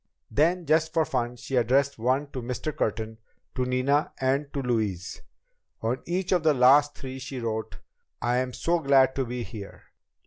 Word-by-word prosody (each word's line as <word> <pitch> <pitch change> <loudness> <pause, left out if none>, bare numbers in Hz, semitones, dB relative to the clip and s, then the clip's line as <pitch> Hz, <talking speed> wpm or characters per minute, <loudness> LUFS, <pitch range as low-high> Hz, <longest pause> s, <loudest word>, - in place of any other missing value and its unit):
Then, 170 +4 +2
just 155 +1 +2
for 160 -1 +3
fun, 120 -3 -2
she 130 +2 -5
addressed 130 +3 +2
one 130 +5 +1
to 130 - -5
Mr. 125 +5 -4
Curtin, 110 +1 -2 0.3
to 125 - -1
Nina 130 +4 +1
and 135 +2 0
to 140 - -3
Louise. 105 -8 -2 0.6
On 115 +3 -1
each 180 +2 -1
of 180 -3 +3
these 155 -2 +3
last 140 +4 +5
three, 130 0 -7
she 130 0 -6
wrote: 110 -2 -3 0.4
"I'm 125 +1 0
so 170 +7 0
glad 135 -3 +4
to 135 - -1
be 125 0 -4
here. 105 -4 -9
130 Hz, 170 wpm, -27 LUFS, 120-145 Hz, 0.6 s, last